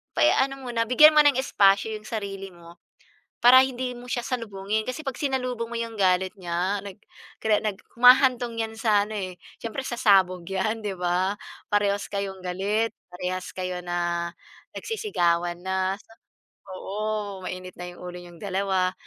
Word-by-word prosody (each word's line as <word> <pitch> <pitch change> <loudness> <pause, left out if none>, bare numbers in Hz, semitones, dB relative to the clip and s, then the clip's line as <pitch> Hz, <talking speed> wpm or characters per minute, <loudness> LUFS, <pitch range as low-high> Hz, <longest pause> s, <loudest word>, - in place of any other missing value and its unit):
pa - - 0
eh, - - +6
ano 270 0 0
muna, 230 -2 -1
bigyan 305 +5 +8
mo - - +7
ng 290 -2 +5
espasyo 205 -3 +3
yung 215 - -14
sarili 200 -3 -5
mo, 170 0 -15 0.6
para 250 +2 +8
hindi 255 -1 -4
mo 245 0 -11
siya 245 - -1
salubungin. 215 -4 -2
Kasi 255 +5 -4
'pag 270 - -2
sinalubong 255 -4 -2
mo 235 - -3
yung 230 0 -4
galit 185 -1 +2
niya 180 +3 -1
nag 200 -2 -9 0.5
kada 215 -1 +3
nag 210 -3 -2 0.2
humahantong 250 -1 +5
yan 225 0 -4
sa 215 -3 +3
ano 215 - -8
eh, 185 -2 -5 0.2
siyempre 230 +4 -4
sasabog 195 -7 +3
yan, 215 +4 -1
'di 195 -2 -2
ba? 180 +2 +1 0.3
Parehas 205 -1 +1
kayong 195 -1 -4
galit, 205 +5 0 0.2
parehas 180 +1 -4
kayo 185 -1 -3
na 175 -1 -1 0.5
nagsisigawan 175 - -1
na. 190 +1 -1 0.8
Oo, 205 0 -4
mainit 185 0 -6
na 180 0 -5
yung 175 - -15
ulo 180 0 -7
niyong 175 -1 -13
2. 190 -2 0
200 Hz, 160 wpm, -25 LUFS, 185-235 Hz, 0.8 s, bigyan